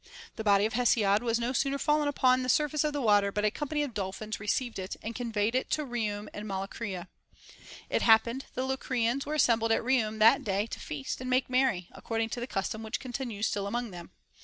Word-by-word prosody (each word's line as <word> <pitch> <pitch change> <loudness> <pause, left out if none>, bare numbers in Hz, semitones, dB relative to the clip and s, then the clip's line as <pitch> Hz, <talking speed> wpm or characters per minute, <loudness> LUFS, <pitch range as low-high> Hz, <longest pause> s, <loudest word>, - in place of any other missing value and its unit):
The 220 - -5
body 200 -1 +4
of 220 - -2
Hesiod 220 -4 +3
was 230 -1 +1
no 240 +2 -1
sooner 275 +2 +1
fallen 300 +1 +2
upon 255 -3 +3
the 255 - -3
surface 300 +2 +2
of 300 - +1
the 290 -2 -3
water, 205 -2 +4
but 210 +1 -1
a 210 - +3
company 295 +3 -2
of 275 -5 -5
dolphins 205 +2 -4
received 225 +2 -1
it, 190 +1 -5
and 225 - -4
conveyed 225 -2 -1
it 255 - 0
to 305 - 0
Iihium 215 -4 -3
and 210 +1 -6
Molycria. 195 -1 -4 0.8
It - - 0
happened 230 +3 +4
the 255 - -1
Locrians 265 0 -1
were 305 - -1
assembled 230 -6 +3
at 225 - +2
Kliium 230 -4 +1
that 225 +5 +5
day 200 0 0
to 230 - -7
feast 145 - -5
and 255 - -4
make 255 0 +1
merry, 255 -9 +2
according 225 0 -3
to 240 - -4
the 240 - -4
custom 205 0 -3
which 220 0 -3
continues 245 -5 -4
still 200 -2 -1
among 240 +1 -3
them. 175 -1 -9
230 Hz, 215 wpm, -29 LUFS, 210-255 Hz, 0.8 s, that